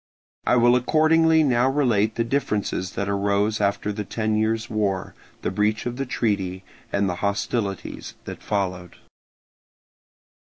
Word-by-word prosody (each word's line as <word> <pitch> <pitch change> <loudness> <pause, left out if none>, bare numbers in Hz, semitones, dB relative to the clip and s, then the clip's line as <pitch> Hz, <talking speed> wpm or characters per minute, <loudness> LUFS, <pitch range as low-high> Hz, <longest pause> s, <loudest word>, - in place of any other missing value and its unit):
I - - +4
will 120 0 +5
accordingly 160 +4 +4
now 125 -2 +3
relate 115 -7 +2
the 115 - +1
differences 105 -7 -1
that 100 - -2
arose 100 +2 +1
after 100 +1 0
the 105 +1 -4
ten 110 +1 -1
years' 110 +1 0
war, 100 -4 -1 0.3
the - - -1
breach 105 +3 0
of 120 0 -3
the 135 -1 -3
treaty, 95 -6 -1 0.3
and 100 0 +1
the 90 -1 -2
hostilities 100 -1 -2
that - - -7
followed. 90 -4 -3
105 Hz, 135 wpm, -24 LUFS, 100-120 Hz, 0.3 s, will